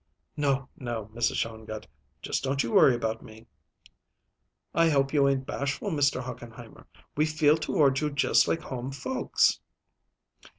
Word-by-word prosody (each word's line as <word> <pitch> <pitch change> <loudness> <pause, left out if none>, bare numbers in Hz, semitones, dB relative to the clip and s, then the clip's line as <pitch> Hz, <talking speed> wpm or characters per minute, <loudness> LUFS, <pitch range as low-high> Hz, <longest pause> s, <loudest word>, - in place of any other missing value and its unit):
"No, 140 -3 0
no, 115 -4 -5
Mrs. 120 +1 0
Shongut; 110 -1 -4 0.4
just - - -2
don't 135 0 0
you 115 - -4
worry 130 - +6
about 115 -1 -3
me." 110 -2 -14 1.3
"I 165 0 +4
hope 135 -2 +1
you 140 -2 +4
ain't 135 -1 -1
bashful, 140 +11 -3
Mr. 140 -4 +1
Hochenheimer. 120 -2 -10 0.3
We 150 +2 +2
feel 155 -1 +3
toward 140 -4 +2
you 150 - 0
just 145 0 +3
like 165 - 0
home 130 0 -5
folks." 255 - +1
135 Hz, 140 wpm, -27 LUFS, 120-145 Hz, 1.3 s, worry